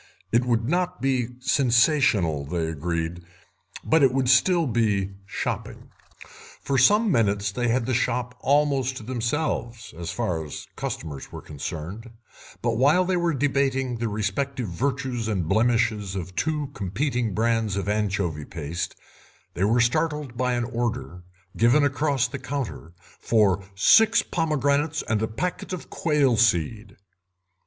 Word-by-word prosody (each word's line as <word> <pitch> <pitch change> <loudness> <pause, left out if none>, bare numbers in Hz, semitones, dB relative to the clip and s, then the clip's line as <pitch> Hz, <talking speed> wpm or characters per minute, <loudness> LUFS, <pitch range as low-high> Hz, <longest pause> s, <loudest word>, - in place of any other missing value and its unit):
It 120 +2 +3
would 115 -2 +1
not 180 +3 0
be 130 -3 0
sensational, 120 - +3
they 80 +3 -2
agreed, 85 +2 -3 0.6
but 160 0 +3
it 135 -3 +5
would 130 -1 0
still 170 +6 +4
be 105 -6 0 0.2
shopping. - - -4 0.7
For 135 -1 0
some 210 - +5
minutes 105 -4 +1
they 120 +4 -1
had 120 +1 +1
the 130 - -1
shop 125 +1 -1
almost 140 -3 +1
to - - -8
themselves, 120 -2 -3
as 85 0 -6
far 80 -3 -2
as 75 - -8
customers 75 -4 -5
were - - -8
concerned, 85 - -6 0.5
but 115 -2 0
while 150 +9 +4
they 185 0 0
were 170 -3 +1
debating 135 -2 0
the 115 -1 -1
respective 110 +4 -2
virtues 125 +3 -2
and 95 -7 -1
blemishes 110 -1 +1
of 95 -1 -6
two 150 -2 -1
competing 115 +2 -2
brands 115 -2 +1
of 100 - -3
anchovy 100 -7 -1
paste 85 +2 -5 0.6
they 95 - 0
were 115 +4 +3
startled 145 +2 0
by 125 +1 0
an 120 0 0
order, 120 -6 -3 0.3
given 120 +6 +4
across 145 -1 +1
the 140 +2 -6
counter, 130 - -5 0.3
for 100 -4 +2
six 225 - +5
pomegranates 150 -1 0
and 110 -3 -1
a 110 - 0
packet 175 +14 -4
of 180 - -7
quail 145 -7 +2
seed. 105 0 +1
120 Hz, 140 wpm, -25 LUFS, 100-140 Hz, 0.7 s, it